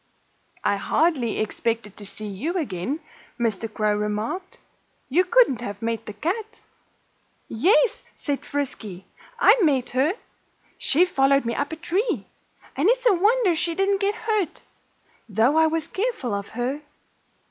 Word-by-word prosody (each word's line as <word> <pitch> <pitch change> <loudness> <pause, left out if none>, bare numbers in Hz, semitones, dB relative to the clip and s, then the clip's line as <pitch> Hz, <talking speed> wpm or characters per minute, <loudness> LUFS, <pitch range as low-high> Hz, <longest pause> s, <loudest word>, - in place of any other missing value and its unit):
"I 200 - +2
hardly 275 0 +1
expected 220 -1 -2
to 205 - -7
see 215 +2 -5
you 210 - -3
again," 270 - -3 0.4
Mr. 225 -2 -1
Crow 215 -1 +1
remarked. 210 - -3 0.5
"You 340 +8 +4
couldn't 370 - +4
have 205 +1 -6
met 230 0 -2
the 210 - -5
cat." 425 - -3 0.9
"Yes!" 380 - +3 0.2
said 285 -2 -3
Frisky. 220 -10 -4 0.3
"I - - +6
met 275 -7 +2
her. 270 +7 +2 0.7
She 340 +6 +4
followed 275 -5 +3
me 235 - -1
up 285 +5 -2
a - - -3
tree. 350 +8 -1 0.5
And 295 +9 +3
it's - - +2
a 465 - +6
wonder 410 0 +3
she 335 +1 -1
didn't 390 +1 +1
get 400 +1 +1
hurt, 425 -7 -1 0.7
though 225 +8 +3
I 320 0 +5
was 320 -1 -1
careful 390 - -2
of 200 0 -3
her. 260 +5 -1
285 Hz, 145 wpm, -24 LUFS, 225-370 Hz, 0.9 s, I